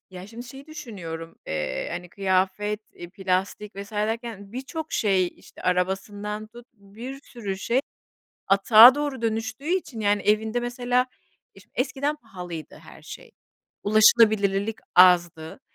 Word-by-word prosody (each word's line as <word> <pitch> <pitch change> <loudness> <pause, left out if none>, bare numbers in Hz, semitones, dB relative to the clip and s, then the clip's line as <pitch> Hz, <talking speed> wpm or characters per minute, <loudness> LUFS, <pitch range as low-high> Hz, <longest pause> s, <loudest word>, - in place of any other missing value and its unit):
ya 185 0 -9
şimdi 235 +3 -10
şey 270 +3 -11
düşünüyorum, 180 - -8
eee, 80 -1 -3
hani 180 - -6
kıyafet, 195 +3 0
iii, 175 0 -10
plastik 195 +2 -2
vs. 200 +2 -8
derken 215 -1 -3
birçok 295 +5 -6
şey, 190 -4 +2
işte, - - -16
arabasından 200 +4 -2
tut, 235 +2 -14
bir 225 +7 -10
sürü 205 -8 -6
şey 235 +6 +1 0.7
atığa 215 +6 +8
doğru 290 -4 -3
dönüştüğü 225 +4 -3
için 345 -11 -2
yani 205 -1 +2
evinde 220 +3 +1
mesela 245 +1 0 0.5
iş 195 0 -17
eskiden 280 +3 -1
pahalıydı 180 - -9
her - - -15
şey, - - -11 0.5
ulaşılabilirlilik 215 -1 +4 0.2
azdı, 175 -1 +4
210 Hz, 125 wpm, -25 LUFS, 190-240 Hz, 0.7 s, atığa